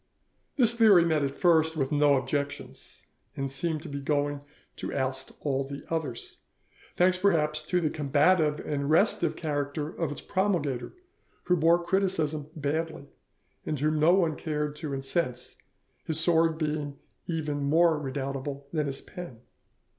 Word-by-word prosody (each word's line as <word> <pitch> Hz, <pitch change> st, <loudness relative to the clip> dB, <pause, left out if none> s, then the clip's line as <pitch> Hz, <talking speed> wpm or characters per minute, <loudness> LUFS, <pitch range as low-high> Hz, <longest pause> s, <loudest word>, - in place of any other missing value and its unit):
This 235 Hz, -5 st, +5 dB
theory 215 Hz, -7 st, +6 dB
met 155 Hz, -3 st, +1 dB
at 140 Hz, 0 st, -3 dB
first 160 Hz, -2 st, +3 dB
with 135 Hz, -3 st, -1 dB
no 145 Hz, -1 st, +4 dB
objections, 140 Hz, +2 st, -4 dB, 0.3 s
and 135 Hz, -1 st, -2 dB
seemed 155 Hz, +2 st, -2 dB
to -, -, -8 dB
be 140 Hz, 0 st, -5 dB
going 145 Hz, 0 st, -1 dB, 0.4 s
to -, -, -4 dB
oust 130 Hz, 0 st, -2 dB
all 135 Hz, -2 st, 0 dB
the 140 Hz, +1 st, -8 dB
others, 150 Hz, -8 st, -4 dB, 0.6 s
thanks, 180 Hz, +1 st, +3 dB
perhaps, 155 Hz, -6 st, +2 dB
to 180 Hz, +4 st, 0 dB
the 155 Hz, -3 st, 0 dB
combative 150 Hz, +2 st, +2 dB
and 140 Hz, -1 st, -2 dB
restive 170 Hz, -1 st, +2 dB
character 145 Hz, -1 st, -3 dB
of 165 Hz, -2 st, -3 dB
its 145 Hz, -, -5 dB
promulgator, 175 Hz, -11 st, -1 dB, 0.5 s
who 180 Hz, -, +2 dB
bore 170 Hz, +1 st, +3 dB
criticism 165 Hz, -6 st, 0 dB
badly, 155 Hz, 0 st, -3 dB, 0.5 s
and 150 Hz, -, -3 dB
whom 155 Hz, +2 st, +1 dB
no 160 Hz, +4 st, +5 dB
one 170 Hz, -5 st, +2 dB
cared 150 Hz, -2 st, -3 dB
to 150 Hz, -2 st, -5 dB
incense, 135 Hz, -1 st, -1 dB, 0.5 s
his 160 Hz, -1 st, 0 dB
sword 165 Hz, -1 st, +3 dB
being 150 Hz, -2 st, -3 dB, 0.3 s
even 150 Hz, -4 st, -2 dB
more 160 Hz, +2 st, +3 dB
redoubtable 140 Hz, 0 st, -4 dB
than 150 Hz, -3 st, 0 dB
his 135 Hz, -1 st, -4 dB
pen. 175 Hz, -11 st, -10 dB
150 Hz, 145 wpm, -28 LUFS, 140-165 Hz, 0.6 s, theory